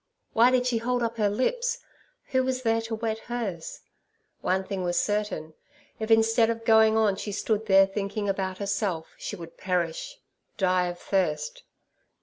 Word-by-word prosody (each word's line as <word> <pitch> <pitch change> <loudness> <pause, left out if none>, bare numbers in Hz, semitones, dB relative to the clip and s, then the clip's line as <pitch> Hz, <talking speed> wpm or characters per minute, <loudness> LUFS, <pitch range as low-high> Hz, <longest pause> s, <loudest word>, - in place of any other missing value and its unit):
Why 235 +2 +6
did 255 -1 +2
she 240 -2 +1
hold 245 +1 0
up 230 0 -2
her 210 -2 +2
lips? 475 - 0 0.5
Who 260 -1 +2
was 255 0 -2
there 225 -1 +2
to 225 0 -4
wet 220 0 -2
hers? 220 -10 -5 0.6
One 190 +1 +1
thing 190 -1 -4
was 175 -1 0
certain, 205 -6 -1 0.5
if 220 0 -3
instead 225 +1 +4
of 230 0 -3
going 220 -1 +5
on 210 -3 +3
she 205 - -4
stood 215 +2 -1
there 195 -1 +7
thinking 205 +1 -3
about 190 -1 -1
herself, 195 -4 -2
she - - -5
would 165 -3 -11
perish—die 180 +1 -2
of 175 0 -5
thirst. 195 - -1
215 Hz, 160 wpm, -27 LUFS, 190-230 Hz, 0.6 s, there